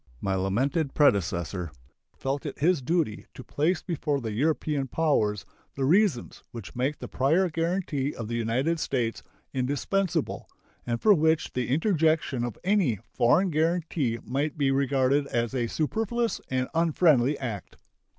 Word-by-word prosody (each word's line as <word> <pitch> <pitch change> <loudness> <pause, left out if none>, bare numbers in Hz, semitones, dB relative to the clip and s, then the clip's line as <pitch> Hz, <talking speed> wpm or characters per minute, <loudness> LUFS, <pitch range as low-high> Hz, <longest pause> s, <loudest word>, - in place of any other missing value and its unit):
My 95 - -1
lamented 130 - 0
predecessor 90 - +1 0.5
felt 135 +1 -2
it - - -6
his 165 +1 +2
duty 150 -5 -1
to 130 - -9
place 160 +8 0
before 150 -5 -1
the 115 -4 -4
European 145 +3 0
powers 115 -9 0 0.3
the 135 - -1
reasons 175 - +1
which 115 -5 -9
make 130 +4 -1
the - - -7
prior 160 +8 +2
guaranty 165 -4 -1
of 115 - -5
the 115 - -5
United 125 +8 0
States 120 -6 -1 0.3
indispensable, 145 +8 -1 0.4
and 120 -1 -1
for 215 - +6
which 160 -2 +1
the 125 -1 -1
interjection 155 - +1
of 120 -2 -4
any 185 - +2 0.2
foreign 180 +10 +3
guaranty 160 -6 0
might 140 +5 -2
be 140 -2 +2
regarded 135 +1 +2
as 120 -2 -1
a 120 -3 0
superfluous 225 - -1
and 130 0 0
unfriendly 155 -5 +3
act. 115 -7 -6
140 Hz, 140 wpm, -27 LUFS, 120-165 Hz, 0.5 s, for